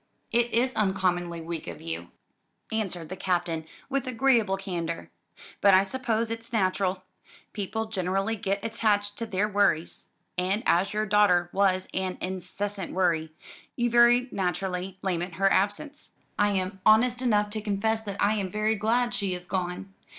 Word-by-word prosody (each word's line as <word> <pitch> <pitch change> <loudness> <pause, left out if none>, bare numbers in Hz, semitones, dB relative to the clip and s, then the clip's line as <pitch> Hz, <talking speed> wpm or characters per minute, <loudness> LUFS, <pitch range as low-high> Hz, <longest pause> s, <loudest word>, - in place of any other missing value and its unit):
"It 240 0 +2
is 255 +3 +2
uncommonly 180 -4 0
weak 165 -1 -5
of - - -7
you," 165 +1 -5 0.6
answered 185 -7 -3
the 185 - -5
Captain 175 -4 -1 0.2
with 275 -1 -2
agreeable 235 -5 +2
candour, 170 -4 -4 0.5
"but 200 -2 +7
I 190 - +6
suppose 230 0 -1
it's 230 0 -5
natural. 185 -3 0 0.5
People 220 +2 -3
generally 195 +1 -1
get 200 0 -2
attached 210 -2 +1
to 230 - -3
their 200 +1 0
worries; 200 -6 +1 0.3
and 195 +5 0
as 190 +3 +3
your 215 0 0
daughter 195 -4 +3
was 190 -1 +2
an 185 -1 -2
incessant 190 +1 -4
worry, 170 -4 +1 0.4
you 240 -1 0
very 240 +1 +5
naturally 185 0 -2
lament 175 -2 -2
her 195 +2 +3
absence. 205 +10 -1 0.3
I 205 - +5
am 190 -1 -2
honest 245 +3 +4
enough 210 -4 +2
to 215 0 -3
confess 220 +1 0
that 200 -1 -5
I 205 +1 +3
am 200 -3 -2
very 215 +3 +1
glad 235 +3 +1
she 195 -6 -1
is 180 0 -9
gone. 185 +1 -3
200 Hz, 155 wpm, -27 LUFS, 185-220 Hz, 0.6 s, but